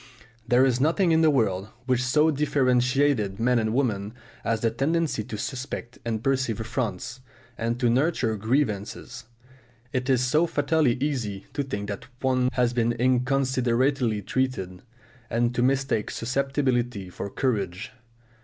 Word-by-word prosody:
There 125 +2 +5
is 130 -1 +1
nothing 170 +4 +3
in 160 0 +4
the 160 - +5
world 105 -8 +1 0.2
which 130 -1 +1
so 150 +5 +3
differentiates 130 -6 +2
men 120 +2 +2
and 110 -1 0
women 110 -4 -1 0.3
as 115 -1 0
the 115 - +2
tendency 145 0 0
to 105 - -6
suspect 130 0 -5
and 115 -1 -3
perceive 130 -5 0
affronts, 115 0 -3 0.4
and 115 +1 -2
to 125 - +2
nurture 125 -2 +1
grievances. 115 +1 -2 0.7
It 130 +1 -1
is 130 -2 +3
so 155 +7 +3
fatally 145 -4 +2
easy 125 -8 -2
to 145 - -1
think 100 -7 -4
that 100 +4 -6
one 130 -1 +2
has 125 -1 +1
been 120 -1 +1
inconsiderately 125 -2 +1
treated, 95 -7 -2 0.5
and 120 +1 +1
to 120 - 0
mistake 130 -4 +1
susceptibility 125 -5 -1
for 100 - -5
courage. 100 -6 -2
125 Hz, 140 wpm, -26 LUFS, 110-135 Hz, 0.7 s, There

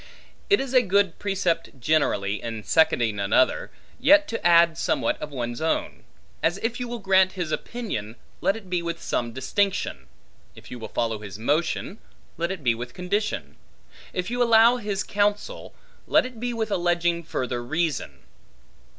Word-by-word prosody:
It 405 - +5
is 270 -1 -4
a 255 - +7
good 200 -4 +1
precept 180 -8 -1
generally, 115 -8 +1
in 115 -2 -5
seconding 115 -9 +2
another, 100 +6 +2 0.3
yet 300 +1 +6
to 230 - -4
add 170 -1 +6
somewhat - - 0
of 150 - -4
one's 120 -3 -4
own: 160 - -2 0.4
as 170 +3 +1
if 230 +2 -1
you 245 - -3
will 240 0 -4
grant 190 -2 +3
his 175 -5 -3
opinion, 120 - -4 0.3
let 195 +3 +2
it 220 -4 -10
be 180 -1 -1
with 170 0 -4
some 120 -1 -2
distinction; 190 - -1 0.5
if - - -14
you 125 - -7
will 110 - -6
follow 115 -2 -1
his 100 -2 -8
motion, 145 +9 -1 0.4
let 170 +1 -2
it 185 -6 -6
be 120 -2 +3
with 125 +2 -7
condition; 205 +4 -2 0.5
if 180 +3 -3
you 245 0 -1
allow 230 +1 +6
his 205 -4 -2
counsel, 205 - -1 0.3
let - - +4
it 250 -3 -8
be 245 +1 -2
with 220 -2 -3
alleging 175 -1 +1
further 125 -6 -3
reason. 160 +4 -2
175 Hz, 165 wpm, -25 LUFS, 130-210 Hz, 0.5 s, a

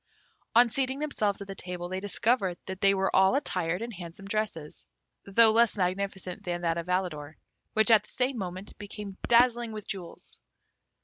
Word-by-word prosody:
On 240 +1 +7
seating 265 +2 0
themselves 215 -10 -1
at - - -14
the 195 - -5
table, 180 -2 -6
they 185 +1 -3
discovered 205 -2 0
that 190 0 -7
they 195 0 +5
were 195 0 0
all 190 +5 +5
attired 180 - -1
in 235 - -5
handsome 175 0 -9
dresses, 200 -8 -3 0.4
though 220 +3 +6
less 230 -1 +3
magnificent 190 +1 -2
than 175 -2 -3
that 170 -1 0
of 170 - -6
Alidor, 160 -5 -2 0.4
which 220 +2 +4
at 220 - +7
the - - -19
same 255 +1 0
moment 185 +1 -6
became 205 -1 -8
dazzling 235 -1 +4
with 215 -1 -7
jewels. 180 -4 -7
195 Hz, 175 wpm, -28 LUFS, 180-225 Hz, 0.4 s, On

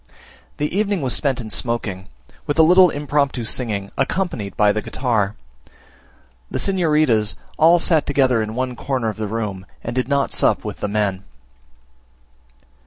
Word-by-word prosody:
The 150 +4 -2
evening 200 -5 0
was 125 - 0
spent 135 -3 0
in 110 -3 -7
smoking, 105 -6 -3 0.4
with 145 - -1
a 160 - +7
little 180 +2 +7
impromptu 145 -4 -1
singing, 105 -4 -2
accompanied 135 - -2
by 105 -1 +4
the 110 - -2
guitar. 110 -6 -1 1.1
The - - -3
signoritas 155 - +2 0.2
all 165 +2 +6
sat 165 -3 +2
together 130 -5 +2
in 110 +1 -4
one 130 0 -2
corner 125 -2 -2
of 110 - -6
the 110 -1 -3
room, 105 -3 -4 0.2
and - - -4
did 130 -1 0
not 140 0 0
sup - - +2
with - - -5
the - - -3
men. 100 -2 -1
125 Hz, 155 wpm, -20 LUFS, 105-150 Hz, 1.1 s, a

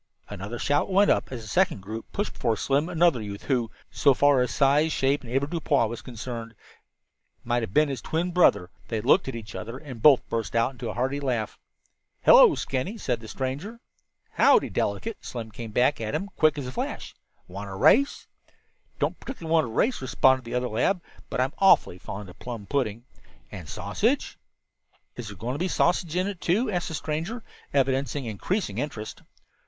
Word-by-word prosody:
Another 105 +6 -6
shout 145 +8 +1
went 200 +2 +5
up - - 0
as 120 -3 -6
a - - -10
second 105 -1 +1
group 110 +3 -7
pushed 205 - -3
before 115 -2 0
Slim 140 - 0
another 170 -7 +3
youth 100 -1 -7
who, 125 -5 0 0.2
so 140 - +3
far 145 -1 +4
as 125 - 0
size, 145 +3 +3
shape 135 0 +1
and 120 - -9
avoirdupois 140 -1 +1
was 115 +1 -5
concerned, 115 -1 -7 0.9
might 120 0 0
have 110 - -4
been 150 +7 +4
his 135 -4 -4
twin 170 +6 -2
brother. 165 - +3 0.2
They 115 - -2
looked 180 - +3
at 135 - -4
each 110 -2 -8
other 115 +3 -6
and 135 -6 -10
both 140 -1 +6
burst 115 -1 -3
into 120 +2 0
a - - -5
hearty 130 +4 -1
laugh. 125 -6 -2 0.6
"Hello, - - +8
Skinny," 135 - -3
said 125 - -2
the 110 - -11
stranger. 140 - -4 0.5
"Howdy, - - +4
Delicate?" 225 -1 -2
Slim 115 -3 -6
came 115 +2 -7
back 125 +5 +2
at 110 -1 -2
him, 200 +1 -3
quick 155 -2 +3
as 140 - -4
a 125 - -5
flash. - - -5 0.3
"Want 100 +3 -7
to 95 - -6
race?" 275 - +3 0.7
"Don't - - -1
particularly 165 -12 -5
want 160 -2 +4
to - - -6
race," 225 - +1
responded 130 0 +3
the 120 +1 -5
other 125 0 0
lad, 125 - +1 0.3
"but - - -3
I'm 130 +3 +1
awfully 190 - +4
fond 100 +2 -7
of 90 - -14
plum 115 -4 -7
pudding." 120 -3 -2 0.5
"And - - -9
sausage?" - - -1 0.8
"Is 120 -3 -7
there 100 -2 -9
going 115 +7 -3
to 140 - -4
be 185 - 0
a - - -5
sausage 175 -1 +1
in 185 +1 +1
it, 200 -4 -5
too?" 210 +7 +1
asked 175 -2 -1
the 160 - -4
stranger, 165 +11 -4 0.3
evidencing 135 0 0
increasing 115 - -2
interest. 115 -6 -5
130 Hz, 190 wpm, -26 LUFS, 115-160 Hz, 0.9 s, Hello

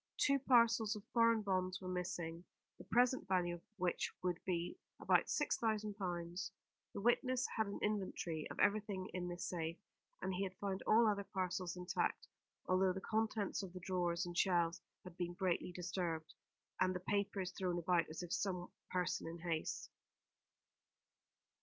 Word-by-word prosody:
Two 275 -1 +4
parcels 230 -4 +4
of 210 - -7
foreign 230 -2 +5
bonds 185 -1 0
were 185 - -7
missing, 175 -2 -3 0.4
the - - -8
present 250 +1 +3
value 180 -2 +2
of 175 - -7 0.2
which 180 -2 0
would 180 -2 -1
be 175 - -1 0.2
about - - +3
six 295 - +1
thousand 215 -2 0
pounds. 175 -2 -3 0.4
The - - -3
witness 250 +3 +3
had 220 -2 +1
an 200 - -4
inventory 185 -6 -1
of - - -7
everything 200 -2 +1
in 180 -1 -2
this 175 0 -4
safe, 165 -1 -2 0.4
and 190 - -2
he 180 - -2
had 190 -1 -3
found 195 -1 -2
all 225 +1 +6
other 200 -1 +2
parcels 185 -2 -2
intact, 180 0 -1 0.4
although 185 0 +3
the 190 - -3
contents 215 0 0
of 190 -3 -7
the 185 - -6
drawers 180 -1 0
and 175 0 -6
shelves 175 -2 +2 0.2
had 180 -2 -10
been 175 0 -2
greatly 180 -1 0
disturbed, 175 -3 -3 0.5
and 185 0 +3
the - - -1
papers 200 -1 0
thrown 185 -2 -1
about, 170 -1 +2
as 155 +3 -5
if 175 - -7
by - - +1
some 180 -3 -1 0.2
person 180 -2 0
in 165 +1 -5
haste. 165 -2 -2
185 Hz, 165 wpm, -38 LUFS, 175-205 Hz, 0.5 s, all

